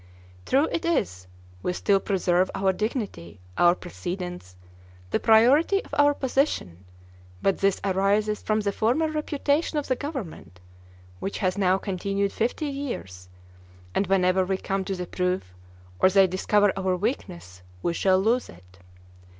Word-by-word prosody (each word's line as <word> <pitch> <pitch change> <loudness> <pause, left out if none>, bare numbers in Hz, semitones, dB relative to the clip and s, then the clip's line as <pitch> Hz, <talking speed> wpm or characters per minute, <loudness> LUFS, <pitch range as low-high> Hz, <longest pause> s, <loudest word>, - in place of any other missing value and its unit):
True 280 +4 +3
it 330 - -2
is, 95 - -1 0.3
we 180 - -1
still 195 +2 +2
preserve 185 -2 +1
our 190 -1 +1
dignity, 200 - -4 0.2
our 175 0 +5
precedence, 180 - -7 0.6
the - - +1
priority 270 - +4
of - - -17
our 290 0 +4
position, 255 - -1 0.5
but 195 - +1
this 195 -1 +2
arises 200 +2 +1
from 215 0 0
the 200 -1 -1
former 255 +11 +1
reputation 300 +1 -1
of 295 - -2
the 255 - +1
government, 245 - -7 0.6
which 195 - -4
has 185 -3 0
now 190 -2 +2
continued 195 +1 -2
fifty 240 +7 -1
years; 240 - -6 0.6
and 200 - 0
whenever 185 -1 +3
we 190 +1 -1
come 195 0 -2
to 195 - -2
the 180 -1 -4
proof, 180 - -2 0.5
or 185 - +5
they 195 0 +5
discover 195 +2 +2
our 190 -1 0
weakness 90 - -4 0.2
we 170 - 0
shall 185 +2 +3
lose 230 +6 +1
it. 90 +2 -17
195 Hz, 145 wpm, -25 LUFS, 180-240 Hz, 0.6 s, our